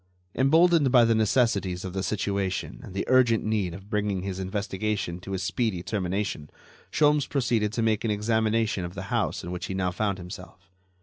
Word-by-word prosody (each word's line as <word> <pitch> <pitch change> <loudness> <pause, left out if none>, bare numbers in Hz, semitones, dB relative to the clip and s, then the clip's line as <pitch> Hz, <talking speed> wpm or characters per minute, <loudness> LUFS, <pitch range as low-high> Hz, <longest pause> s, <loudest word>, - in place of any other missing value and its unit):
Emboldened 160 +1 +4
by 120 -2 +6
the 115 - +3
necessities 105 -5 +1
of 90 - -5
the 95 - -2
situation 100 -1 -2
and 95 - -11
the 100 - -1
urgent 125 -3 +4
need 105 -6 -1
of 95 +1 -11
bringing 105 -3 -1
his 95 -1 -4
investigation 95 -1 -2
to 95 +2 -5
a - - -1
speedy 95 0 -1
termination, 95 -6 -2 0.4
Sholmes 150 -1 +3
proceeded 120 -6 +1
to 115 - 0
make 110 -2 +1
an 115 - 0
examination 110 -1 +1
of 85 +1 -6
the - - -5
house - - 0
in 85 - -6
which 90 - -4
he 95 - -4
now 90 -1 0
found 100 +1 -1
himself. 90 -1 -11
105 Hz, 185 wpm, -26 LUFS, 95-115 Hz, 0.4 s, by